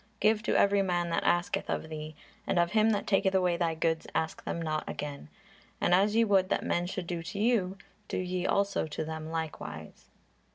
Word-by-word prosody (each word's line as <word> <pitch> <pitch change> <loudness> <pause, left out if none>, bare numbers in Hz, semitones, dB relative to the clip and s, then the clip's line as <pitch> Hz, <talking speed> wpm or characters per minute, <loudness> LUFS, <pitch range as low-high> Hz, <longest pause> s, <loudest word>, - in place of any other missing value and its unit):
Give 215 0 +3
to 230 - +1
every 200 0 +4
man 175 -2 0
that - - 0
asketh 175 0 +1
of - - -2
thee; 155 0 -6 0.3
and - - +1
of 175 0 +3
him 220 0 +4
that 205 -2 0
taketh 195 -1 +2
away 180 -2 +3
thy 170 -2 0
goods 160 0 0
ask 160 0 -1
them - - -2
not 155 -2 -1
again. 140 - -6 0.5
And 175 - +2
as 200 +4 +4
ye 230 - +5
would 195 -3 +3
that - - 0
men 175 0 0
should 185 -1 -4
do 170 -1 -3
to 190 +5 -7
you, 200 -4 +1 0.3
do - - -3
ye 180 0 -1
also 200 -4 +1
to 155 +1 -4
them 160 0 -5
likewise." 150 - -6
175 Hz, 205 wpm, -30 LUFS, 160-200 Hz, 0.5 s, ye